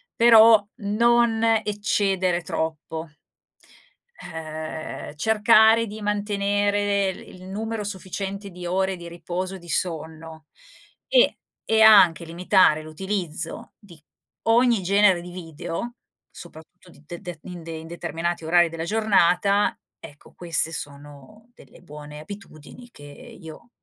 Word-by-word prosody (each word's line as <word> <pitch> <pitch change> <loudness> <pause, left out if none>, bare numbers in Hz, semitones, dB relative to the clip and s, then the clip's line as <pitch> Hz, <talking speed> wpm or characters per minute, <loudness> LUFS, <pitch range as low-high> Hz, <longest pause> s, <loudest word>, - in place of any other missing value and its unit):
però 225 -2 +7
non 230 +1 +2 0.2
eccedere 195 -4 0
troppo 160 0 -5 1.1
ehm, 160 -2 -7
cercare 220 +5 +4
di 215 +2 -8
mantenere 205 -1 0
l - - -13
il 185 - -14
numero 220 +2 -4
sufficiente 195 0 -6
di 180 0 -9
ore 190 +2 0
di 170 -1 -10
riposo 180 +2 -5
e 190 - -10
di 175 - -14
sonno. 160 -2 -4 0.6
E - - +3 0.3
e 220 - +1
anche 185 -7 +6
limitare 170 -1 +3
l'utilizzo 170 0 -5
di 185 -6 -16 0.5
ogni 235 -1 +3
genere 190 -1 +3
di 180 - -10
video, 170 +6 -6 0.3
soprattutto 170 +3 -14
di 160 - -19
de 175 +3 -9
de 175 -4 -8
in 180 -2 -9
de 165 - -8
in 160 0 -8
determinati 170 0 -4
orari 175 +2 +4
della 165 0 -6
giornata, 200 -1 +2 0.2
ecco 145 - -15
queste 165 -1 -1
sono 145 - -10
delle - - -18
buone 150 -3 -11
abitudini 200 +5 -12
che 145 - -16 0.4
io 160 +7 -12
185 Hz, 120 wpm, -23 LUFS, 165-205 Hz, 1.1 s, però